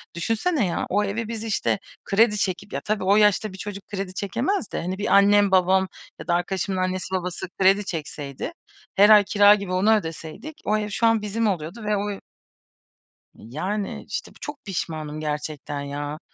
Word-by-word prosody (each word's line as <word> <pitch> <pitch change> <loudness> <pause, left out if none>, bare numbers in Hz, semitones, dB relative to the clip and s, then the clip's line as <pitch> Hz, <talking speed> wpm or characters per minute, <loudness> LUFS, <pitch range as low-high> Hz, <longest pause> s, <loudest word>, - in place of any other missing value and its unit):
düşünsene 225 - 0
ya, 175 - -1
o 205 +2 +2
evi 215 +3 -2
biz 225 -1 -5
işte, 215 -2 0 0.3
kredi 210 +1 +3
çekip, 195 +1 -2
ya, - - -2
tabii 210 -2 -1
o 195 +2 +4
yaşta 210 -1 +3
bir - - -9
çocuk 200 0 -7
kredi 195 -2 -4
çekemez 235 - -2
de - - -2
hani, 185 +2 -3
bir 200 0 +2
annem, 205 0 +5
babam 190 0 +4 0.3
ya - - -9
da 170 - +2
arkadaşımın 185 +2 -1
annesi, 185 0 -2
babası 180 0 -3
kredi 195 +2 +4
çekseydi, 150 - -5 0.4
her 205 +2 +7
ay 210 -1 +8
kira 205 +1 +6
gibi 200 -3 -4
onu 210 +4 +4
ödeseydik 190 - -6
o 215 +1 +2
ev 210 0 -3
şu 230 +3 0
an 225 -1 +3
bizim 215 +2 -1
oluyordu 185 +4 -3
ve 210 0 +1
o 205 0 -3 1.2
Yani. 185 - -4
İşte, - - -5
bu - - -22
çok 295 -1 -7
pişmanım 155 -5 -4
gerçekten, 150 -1 -4
ya. 145 +1 -5
195 Hz, 180 wpm, -24 LUFS, 175-210 Hz, 1.2 s, ay